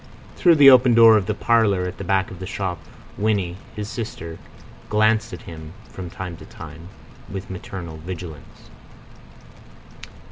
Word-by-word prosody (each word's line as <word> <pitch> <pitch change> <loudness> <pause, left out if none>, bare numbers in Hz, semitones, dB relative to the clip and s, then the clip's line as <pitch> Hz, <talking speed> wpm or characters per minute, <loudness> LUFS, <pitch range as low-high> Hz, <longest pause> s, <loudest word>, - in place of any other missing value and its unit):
Through 175 -2 +5
the 140 -2 +9
open 125 -2 +6
door 115 -1 +8
of 100 -3 +1
the 105 - -1
parlour 110 -6 +2
at 90 - -6
the - - -4
back 95 +1 0
of 95 - -10
the 95 - -6
shop 95 -4 -3 0.4
Winnie, 100 -4 0 0.2
his 105 -1 -5
sister, 105 -8 -6 0.5
glanced 110 +1 +2
at 90 - -9
him 80 -1 -10 0.2
from 90 -2 -8
time 90 -1 -7
to - - -12
time 80 +2 -11 0.4
with 95 0 -7
maternal 90 -3 -7
vigilance. 80 -3 -9
95 Hz, 150 wpm, -22 LUFS, 85-110 Hz, 0.5 s, the